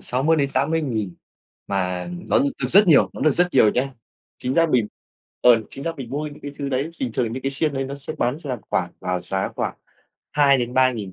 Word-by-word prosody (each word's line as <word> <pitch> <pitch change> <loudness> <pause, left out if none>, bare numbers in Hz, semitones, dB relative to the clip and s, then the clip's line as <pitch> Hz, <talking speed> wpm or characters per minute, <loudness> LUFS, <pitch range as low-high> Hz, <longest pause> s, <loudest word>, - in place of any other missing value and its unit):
60.000-80.000 135 - 0 0.5
mà 90 - -2 0.2
nó - - +4
được 280 +2 +1
được - - 0
rất 200 +2 +7
nhiều, 155 -5 +5
nó - - -9
được 155 - +4
rất 175 +5 +3
nhiều 110 -5 +5
nhá. 130 +2 0 0.5
Chính 125 +1 -2
ra 165 0 +4
mình 125 -8 +2 0.5
ờ, 120 -2 +6
chính 135 - -8
ra 165 - -1
mình 130 -3 -8
mua 150 +2 -3
những 145 0 -10
cái 145 - -5
thứ 140 - -3
đấy 140 +4 -1
bình 125 -3 -2
thường 115 -1 -1
những 130 +2 -5
cái 135 - -1
xiên 145 +2 +2
đấy 135 - -1
nó 135 +1 -5
sẽ 140 +2 -7
bán 125 +5 0
ra 140 -6 -4
khoảng - - 0
vào 90 0 -2
giá 95 +1 0
khoảng - - -2 0.6
2.000-3.000 130 -6 +2
135 Hz, 210 wpm, -22 LUFS, 120-150 Hz, 0.6 s, rất